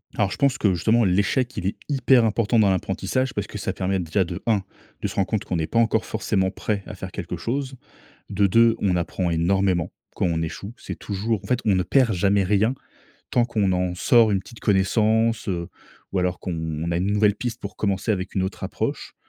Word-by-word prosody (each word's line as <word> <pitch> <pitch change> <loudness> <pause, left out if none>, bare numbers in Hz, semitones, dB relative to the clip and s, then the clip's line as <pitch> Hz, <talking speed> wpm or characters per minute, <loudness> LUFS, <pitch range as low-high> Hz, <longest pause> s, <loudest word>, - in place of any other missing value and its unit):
Alors 100 -2 +1
je - - -5
pense 140 -2 +2
que 100 -6 +2
justement 110 +7 +2
l'échec 105 +7 +1
il 90 - -2
est - - -1
hyper 135 -3 +4
important 115 +1 +2
dans 105 -2 +5
l'apprentissage 95 +7 -1
parce - - -2
que - - -7
ça - - -3
permet 95 0 -1
déjà 90 +3 +1
de 85 +1 -6
1, 105 -4 +2 0.4
de - - 0
se - - -8
rendre 95 - +1
compte 110 -3 -1
qu'on 90 - -2
est 80 - -1
pas 115 - +1
encore 110 -1 +2
forcément 100 -3 0
prêt 105 0 -3
à 105 - -8
faire 95 -1 -7
quelque - - -5
chose. 130 +2 -3 0.5
De 100 0 +2
2 115 +3 +5
on 95 -3 +2
apprend 85 +1 -1
énormément 90 +1 +1 0.2
quand - - +1
on 80 -2 0
échoue. 100 +7 -6
C'est - - -8
toujours 105 +2 -2
en - - -7
fait, 125 -1 +1
on 105 -4 +3
ne 90 - +1
perd 120 +4 +3
jamais 100 +2 +2
rien 105 +6 +2 0.6
tant 120 - +3
qu'on 105 -5 0
en 90 -1 0
sort 115 +3 +4
une 100 - +2
petite 115 +4 -14
connaissance, 110 +3 +2
heu, 85 -2 -2 0.4
ou 95 - 0
alors 90 0 -1
qu'on 90 - -4 0.3
on 85 - -2
a - - 0
une 95 +3 0
nouvelle 105 -1 +3
piste 120 -2 -4
pour 100 0 -7
commencer 100 +1 -1
avec 95 -1 -4
une 95 - +2
autre 95 - -5
approche. - - -4
100 Hz, 225 wpm, -23 LUFS, 95-115 Hz, 0.6 s, dans